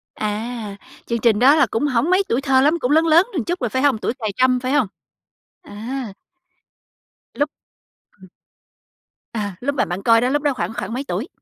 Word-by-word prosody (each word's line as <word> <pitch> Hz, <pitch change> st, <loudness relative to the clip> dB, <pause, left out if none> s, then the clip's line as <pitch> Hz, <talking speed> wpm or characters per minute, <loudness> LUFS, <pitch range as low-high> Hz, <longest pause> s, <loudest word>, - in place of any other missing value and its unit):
À, 215 Hz, 0 st, -4 dB, 0.3 s
chương 235 Hz, 0 st, -2 dB
trình 225 Hz, -2 st, +3 dB
đó 275 Hz, +5 st, +6 dB
là 290 Hz, -4 st, +4 dB
cũng 290 Hz, +6 st, 0 dB
hổng 260 Hz, +4 st, +1 dB
mấy 370 Hz, +2 st, +3 dB
tuổi 240 Hz, -, +1 dB
thơ 270 Hz, -1 st, +3 dB
lắm, 310 Hz, +5 st, +2 dB
cũng 250 Hz, -, -1 dB
lớn 320 Hz, +2 st, +4 dB
lớn 330 Hz, +3 st, +6 dB, 0.2 s
chút 350 Hz, +1 st, -1 dB
rồi, 245 Hz, -4 st, -1 dB
phải 260 Hz, -, -1 dB
không? 280 Hz, -4 st, +3 dB
Tuổi 220 Hz, -, -2 dB
cài 215 Hz, -2 st, -2 dB
trâm, 255 Hz, 0 st, +3 dB
phải 255 Hz, +1 st, -3 dB
hông? 275 Hz, -8 st, +3 dB, 0.8 s
À. 235 Hz, -, -6 dB, 1.2 s
Lúc 290 Hz, +1 st, 0 dB, 0.7 s
ừm 190 Hz, -, -14 dB, 1.1 s
À, 205 Hz, -4 st, -3 dB
lúc 285 Hz, +3 st, -2 dB
mà -, -, +1 dB
bạn 175 Hz, +3 st, -4 dB
coi 230 Hz, -1 st, +5 dB
đó, 250 Hz, -, +1 dB
lúc 290 Hz, +2 st, 0 dB
đó 290 Hz, -2 st, +2 dB
khoảng 230 Hz, -, -4 dB
khoảng 230 Hz, -, -5 dB
mấy 260 Hz, +3 st, -3 dB
tuổi? -, -, -3 dB
255 Hz, 200 wpm, -20 LUFS, 225-285 Hz, 1.2 s, đó